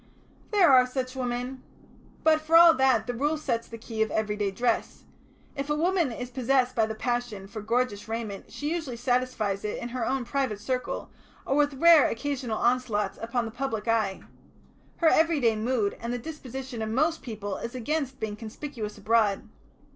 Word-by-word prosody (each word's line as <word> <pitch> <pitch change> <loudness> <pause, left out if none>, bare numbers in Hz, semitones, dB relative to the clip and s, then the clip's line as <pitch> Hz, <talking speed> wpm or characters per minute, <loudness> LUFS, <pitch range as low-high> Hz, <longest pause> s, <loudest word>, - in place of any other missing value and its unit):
"There 390 -8 +5
are 255 -1 +7
such 255 0 -4
women. 250 +1 -3 0.6
But 315 -1 +4
for 320 +1 +5
all 335 0 +9
that 265 -5 +3
the 245 - -3
Rule 295 +6 0
sets 235 -6 -2
the 230 - -8
key 225 -1 -5
of 220 - +2
everyday 210 -2 -1
dress. 235 +6 -1 0.5
If 275 +1 -4
a 295 - +2
woman 340 -2 +1
is 245 +2 -6
possessed 255 0 +1
by 225 -3 +2
the 220 - -4
passion 240 -4 -3
for 215 +2 -7
gorgeous 225 -1 -1
raiment 220 -3 -5
she 295 +2 -3
usually 315 -8 -4
satisfies 245 -5 0
it 210 - -3
in 240 - -5
her 245 0 -3
own 260 +1 -1
private 250 -4 -1
circle, 255 +4 -3 0.3
or 270 - 0
with 290 -1 +2
rare 330 +1 +7
occasional 250 -2 -3
onslaughts 235 -5 0
upon 235 +1 -1
the 225 - -6
public 230 -3 -3
eye. 215 -4 0 0.7
Her 335 - +3
everyday 310 -9 +4
mood 220 -2 0
and 235 +1 -3
the 245 - -1
disposition 265 -3 -7
of 220 - -2
most 305 +8 +1
people 210 -5 -5
is 235 +2 -6
against 270 +1 -2
being 215 -1 -3
conspicuous 220 0 -7
abroad. 210 -1 +1
245 Hz, 175 wpm, -27 LUFS, 220-275 Hz, 0.7 s, all